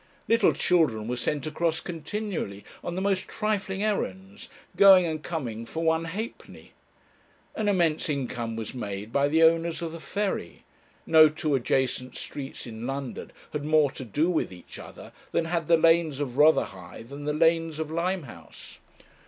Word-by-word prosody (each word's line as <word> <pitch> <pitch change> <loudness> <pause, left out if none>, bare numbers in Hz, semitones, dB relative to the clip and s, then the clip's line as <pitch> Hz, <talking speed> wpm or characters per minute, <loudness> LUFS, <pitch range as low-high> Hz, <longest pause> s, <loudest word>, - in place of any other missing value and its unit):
Little 230 -3 +4
children 140 -12 +1
were 125 - -1
sent 140 +3 -2
across 160 +1 0
continually 165 - -5 0.2
on 175 - -4
the 190 - -2
most 195 -1 0
trifling 205 -2 -2
errands, 200 -1 -3 0.3
going 190 -2 +8
and 155 -2 -3
coming 125 -10 -4
for 160 +8 -5
one 160 0 +2
halfpenny. 210 +8 -7 0.8
An 215 - -2
immense 170 -6 +1
income 125 -5 -3
was 110 +1 -5
made 105 -2 -6
by 140 0 +3
the 160 +3 +3
owners 165 0 +3
of 165 - -3
the 165 - -8
ferry. 195 - -3 0.4
No 155 -1 +7
two 155 0 -2
adjacent 130 0 0
streets 140 -1 -6
in 115 0 -7
London 135 -1 -5 0.2
had 150 -1 -3
more 150 -2 +3
to 130 - -8
do 145 - 0
with 175 - 0
each 90 -1 -12
other - - -11 0.2
than 165 - +1
had 165 -1 -2
the 170 - +5
lanes 165 -3 +3
of 135 -4 -3
Rotherhithe 115 - +1
and 145 +1 -7
the - - +2
lanes 165 0 +2
of 155 -1 -4
Limehouse. 170 - -5
160 Hz, 160 wpm, -27 LUFS, 130-170 Hz, 0.8 s, going